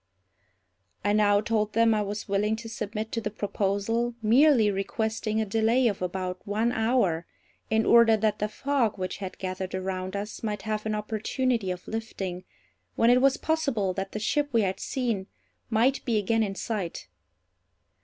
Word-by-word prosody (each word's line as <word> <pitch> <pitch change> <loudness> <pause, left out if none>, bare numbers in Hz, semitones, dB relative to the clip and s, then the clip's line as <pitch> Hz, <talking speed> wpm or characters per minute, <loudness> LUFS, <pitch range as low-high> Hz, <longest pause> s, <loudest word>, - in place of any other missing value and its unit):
I 205 - +3
now 205 -1 +4
told 215 -1 0
them 230 0 +4
I 215 - +1
was 205 +1 -4
willing 210 +2 +1
to 225 +1 -8
submit 220 0 -4
to 230 - -2
the 210 - -2
proposal, 205 +3 -1
merely 235 -1 +5
requesting 220 +2 -2
a 220 - +1
delay 225 +4 +2
of 205 -4 -2
about 180 0 -3
one 215 +4 0
hour, 220 -8 +1 0.4
in 220 0 +2
order 235 -1 +6
that 215 0 0
the 210 - 0
fog 260 -2 0
which 185 -1 -3
had 190 -2 -6
gathered 185 0 -4
around 185 0 -3
us 205 +2 -5
might 210 -3 -3
have 215 0 -2
an 215 - 0
opportunity 220 +1 -1
of 180 0 -5
lifting, 195 -5 -5 0.5
when 230 +1 +4
it 250 +1 +5
was 275 0 +4
possible 275 -12 0
that 195 +1 -4
the 215 - -3
ship 290 +7 0
we 230 -3 +3
had 190 -1 -1
seen 230 -7 -2 0.4
might 240 +4 +2
be 230 -3 +1
again 225 +2 +1
in 200 -3 -1
sight. 195 - -4
215 Hz, 170 wpm, -27 LUFS, 195-230 Hz, 0.5 s, order